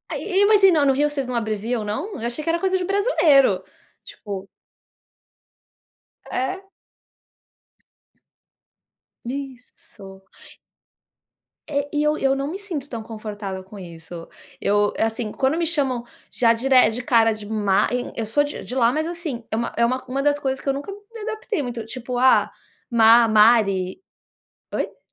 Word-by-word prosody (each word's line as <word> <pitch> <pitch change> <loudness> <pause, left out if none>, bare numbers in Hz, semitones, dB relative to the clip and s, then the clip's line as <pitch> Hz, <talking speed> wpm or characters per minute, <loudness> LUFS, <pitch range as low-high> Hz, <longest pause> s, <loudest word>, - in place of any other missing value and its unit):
E, 400 0 +1
mas 420 -1 +4
e 385 - +8
não 300 -4 +3
no 270 - +4
Rio 295 +2 +2
vocês 275 -3 -3
não 250 - -3
abreviam 220 +1 -2
não? 215 - -3
Eu 230 - -2
achei 240 +6 -5
que 330 - -2
era 335 +1 +1
coisa 380 -1 +1
de 365 - -3
brasileiro. 305 - +3 0.4
Tipo. 195 -2 -8 1.8
É? 380 +10 -3 2.6
Isso. 245 -7 -9 1.5
É, 285 -1 -1
e 295 - 0
eu 300 0 +1
eu 270 0 +2
não 275 +1 -2
me 345 +6 -4
sinto 330 -9 -6
tão 230 -2 -6
confortável 210 -3 -6
com 195 +2 -13
isso. 170 -2 -10 0.3
Eu, 205 0 +2
assim, 225 -1 -1
quando 270 +5 0
me 340 - 0
chamam 265 -7 -1 0.3
já 230 -2 +3
dere 250 -1 +3
cara 225 -2 +3
de 215 -1 -9
Ma, 205 -2 +1 0.3
eu 225 - -2
sou 225 +7 +2
de 290 - -6
de 250 - -7
lá 240 -2 +3
mas 310 +1 -1
assim, 330 -8 -5
é - - 0
uma 235 - -2
é 235 - +3
uma 255 +2 -1
uma 270 +2 -2
das 290 0 +2
coisas 265 -1 -3
que - - -2
eu 275 - +2
nunca 285 +8 -6 0.2
me 460 - -8
adaptei 435 -4 -3
muito, 240 -4 -5
tipo: 250 +1 -6
"Ah, 260 +1 +4 0.4
Ma, 230 0 +6
Mari". 210 - +3 0.7
Oi? - - -3
250 Hz, 160 wpm, -22 LUFS, 220-295 Hz, 2.6 s, e